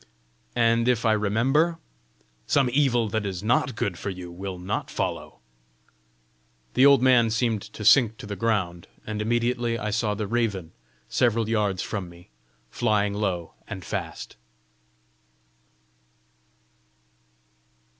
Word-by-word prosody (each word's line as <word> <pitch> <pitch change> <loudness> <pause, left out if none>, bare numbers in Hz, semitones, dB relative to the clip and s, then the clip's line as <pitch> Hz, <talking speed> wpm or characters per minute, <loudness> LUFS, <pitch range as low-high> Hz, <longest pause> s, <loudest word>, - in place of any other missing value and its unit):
"And 115 0 +3
if 125 -2 +2
I 110 - +4
remember?" 125 +11 +2 0.7
"Some 140 -4 +2
evil 125 -5 +2
that 110 +1 -1
is 95 -2 -4
not 125 +2 +1
good 90 -5 -2
for - - -4
you, 90 -2 -7
will 95 +1 -6
not 90 +3 -3
follow." - - -4 1.4
The 130 +3 +6
old 140 -3 +5
man 125 -3 +5
seemed 110 -1 0
to 105 +1 -9
sink 115 -3 +5
to - - -9
the 100 0 -5
ground, 90 -5 -1 0.2
and 105 -1 -4
immediately 120 +1 0
I 105 -1 -3
saw 105 -1 0
the 105 +1 -3
raven 100 -6 -1 0.4
several 115 -2 +1
yards 105 -4 0
from 95 -4 -4
me, 85 -2 -16 0.4
flying 105 -1 +1
low 95 -5 -2
and - - -7
fast. - - -5
110 Hz, 125 wpm, -25 LUFS, 100-120 Hz, 1.4 s, The